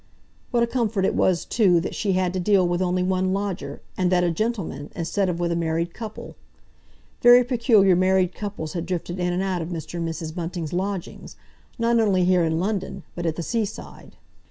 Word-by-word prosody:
What 235 -1 +2
a - - +4
comfort 230 -5 0
it - - +1
was, 180 -2 +1
too, 190 -7 +3
that - - -4
she 200 -3 0
had 185 -1 0
to 185 - -1
deal 185 -1 +3
with 175 +1 0
only 180 0 +1
one 185 0 +1
lodger, 195 -2 -4
and 185 -1 +1
that 180 -1 +3
a 175 - +2
gentleman, 180 - -3
instead 180 +3 -1
of 170 -1 -2
with 170 -1 0
a - - 0
married 170 0 -1
couple! 220 -2 -8 0.9
Very 245 +1 +8
peculiar 230 -6 +4
married 185 0 +2
couples 200 -7 -5
had 170 -2 -4
drifted 175 0 -3
in 180 0 0
and 180 +2 -1
out 185 -2 -1
of 160 - -4
Mr. 170 0 -5
and 165 -1 -2
Mrs. 160 -1 -5
Bunting's 170 -2 -4
lodgings, 190 0 -4 0.4
not 235 0 +2
only 195 -5 +3
here, 180 -1 +3
in 160 0 0
London, 195 -1 -3
but 175 -1 -3
at 160 - -1
the 170 - -4
seaside. 220 +1 -5
185 Hz, 205 wpm, -24 LUFS, 175-200 Hz, 0.9 s, Very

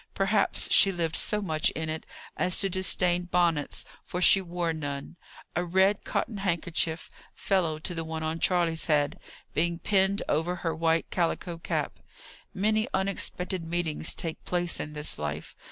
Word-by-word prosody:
Perhaps 195 +1 +1
she 195 - +6
lived 165 -3 -1
so 210 0 +1
much 155 -4 +1
in 160 0 -3
it 155 0 -4 0.3
as 180 0 +2
to 195 -1 +1
disdain 180 -1 +1
bonnets, 170 -4 +1 0.2
for 180 - -4
she 195 +2 +7
wore 175 -2 -2
none 145 0 -5 0.4
a 175 - +1
red 190 +3 +2
cotton 215 - -2
handkerchief, 170 -3 -1 0.2
fellow 175 -6 +1
to 160 +3 -2
the 165 -1 -3
one 160 0 -4
on 160 +1 -2
Charley's 170 -3 +1
head, 145 -2 +2 0.3
being 170 0 +1
pinned 195 +2 +2
over 165 +4 0
her 165 -2 -2
white 165 0 +1
calico 170 -1 -1
cap. - - -2 0.5
Many 215 +3 +1
unexpected 190 -2 -1
meetings 165 -2 -1
take 165 -2 -4
place 175 -1 -1
in 150 - -5
this 150 - -2
life. 75 +1 -5
170 Hz, 155 wpm, -28 LUFS, 160-185 Hz, 0.5 s, she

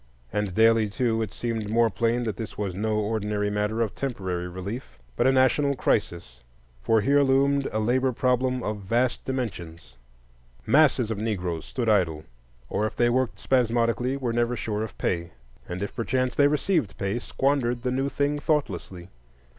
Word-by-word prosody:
And 105 -3 -1
daily, 115 -1 +4
too, 115 0 0
it 110 -4 -3
seemed 115 -3 -3
more 115 0 +3
plain 115 +4 0
that 110 -4 -2
this 110 +2 -7
was 100 -3 -2
no 110 +3 -1
ordinary 105 -1 -1
matter 105 +2 -1
of 110 -3 -1
temporary 95 -9 -3
relief, 95 - -7 0.2
but - - +2
a - - +5
national 135 +2 +3
crisis; 85 - -1 0.4
for 110 - +3
here 140 +5 +4
loomed 140 +1 +3
a - - -2
labor 130 +4 +2
problem 125 +1 0
of 105 0 -2
vast 120 +6 0
dimensions. 85 - -5 0.7
Masses 130 -3 +4
of 105 - -3
Negroes 90 -7 -2
stood 125 -4 -3
idle, 85 -8 +2 0.4
or, 105 - 0
if - - -8
they 120 0 +3
worked 130 0 0
spasmodically, 120 +1 +1
were 125 -4 -2
never 120 +1 +1
sure 105 -2 -3
of 110 -2 -6
pay; 85 -3 -2 0.4
and 90 +2 -3
if 100 - -5
perchance 130 +1 0
they 145 - +5
received 150 - 0
pay, 100 +4 -1
squandered 125 -2 0
the 125 - 0
new 135 +2 0
thing 145 +2 0
thoughtlessly. 95 - -2
115 Hz, 170 wpm, -26 LUFS, 105-130 Hz, 0.7 s, a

